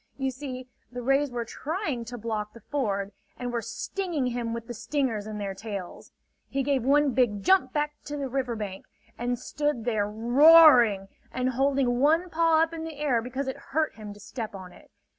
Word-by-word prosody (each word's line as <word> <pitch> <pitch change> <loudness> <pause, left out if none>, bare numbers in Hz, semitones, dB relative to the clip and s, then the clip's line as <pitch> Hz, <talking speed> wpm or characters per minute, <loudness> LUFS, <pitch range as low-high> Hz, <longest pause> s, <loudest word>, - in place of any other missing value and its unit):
You 265 -1 -1
see, 255 -1 -7 0.2
the 245 0 -6
rays 275 +3 +2
were 240 -1 -4
trying 290 - -4
to 245 +1 -7
block 215 -2 -4
the 230 - -12
ford, 200 -7 -2 0.3
and 245 -1 -4
were 235 - -1
stinging 345 - -3
him 240 -2 -2
with 230 0 -5
the 240 - -6
stingers 230 -2 -2
in 215 -1 -5
their 200 -2 -3
tails. 200 -3 -7 0.4
He 275 0 -1
gave 275 -1 +1
one 285 +2 +3
big 215 -6 +1
jump 380 - +4
back 295 0 -1
to 295 0 -5
the 280 -1 -3
river 255 -2 -2
bank 200 -3 -6 0.3
and 245 +1 -2
stood 290 -2 -2
there 215 -4 0
roaring, 240 -3 +6 0.2
and 255 0 -1
holding 265 -1 +1
one 325 +6 +3
paw 325 -1 +4
up 325 0 -3
in 325 -1 -5
the 325 -1 -6
air 275 -6 +1
because 260 +3 -4
it 265 - -3 0.2
hurt 315 -1 +2
him 215 -2 -9
to - - -15
step 220 0 -6
on 185 -2 -10
it. - - -18
250 Hz, 200 wpm, -27 LUFS, 225-290 Hz, 0.4 s, roaring